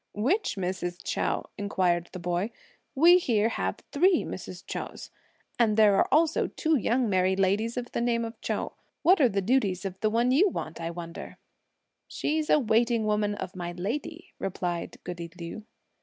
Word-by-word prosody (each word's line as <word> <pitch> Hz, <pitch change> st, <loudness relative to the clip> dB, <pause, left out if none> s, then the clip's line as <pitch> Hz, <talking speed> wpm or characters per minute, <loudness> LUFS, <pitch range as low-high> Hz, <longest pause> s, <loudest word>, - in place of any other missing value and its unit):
"Which 275 Hz, -, +1 dB
Mrs. 180 Hz, -2 st, -3 dB
Chou?" -, -, -1 dB, 0.2 s
inquired 180 Hz, -4 st, 0 dB
the -, -, -7 dB
boy; 175 Hz, +3 st, -1 dB, 0.5 s
"we 345 Hz, +6 st, +7 dB
here 225 Hz, -, +2 dB
have -, -, -2 dB
three 350 Hz, +4 st, +4 dB
Mrs. 180 Hz, 0 st, -7 dB
Chous; -, -, -6 dB, 0.5 s
and 220 Hz, -3 st, +3 dB
there 210 Hz, -2 st, +6 dB
are -, -, +3 dB
also 315 Hz, +3 st, +3 dB
two 320 Hz, -1 st, 0 dB
young 245 Hz, -1 st, +1 dB
married 190 Hz, -1 st, +2 dB
ladies 210 Hz, +5 st, +1 dB
of 245 Hz, -1 st, -4 dB
the -, -, -2 dB
name 235 Hz, -1 st, +1 dB
of 225 Hz, -, -9 dB
Chou. -, -, -2 dB, 0.3 s
What 365 Hz, -1 st, +5 dB
are 255 Hz, -, +6 dB
the 195 Hz, -2 st, -1 dB
duties 200 Hz, -5 st, +1 dB
of 190 Hz, -1 st, -5 dB
the 215 Hz, -, +2 dB
one 235 Hz, +3 st, +2 dB
you 355 Hz, +10 st, +5 dB
want, 165 Hz, -, -6 dB
I 165 Hz, -, -2 dB
wonder 170 Hz, 0 st, -8 dB, 0.3 s
?" -, -, -51 dB, 0.3 s
"She's 310 Hz, 0 st, -2 dB
a -, -, +6 dB
waiting 230 Hz, -2 st, +2 dB
woman 210 Hz, -1 st, +1 dB
of 190 Hz, -, -6 dB
my 175 Hz, -1 st, -4 dB
lady," 295 Hz, -, -5 dB
replied 175 Hz, -2 st, -3 dB
goody 170 Hz, -1 st, -6 dB
Liu. 170 Hz, +6 st, -7 dB
215 Hz, 175 wpm, -28 LUFS, 185-250 Hz, 0.5 s, we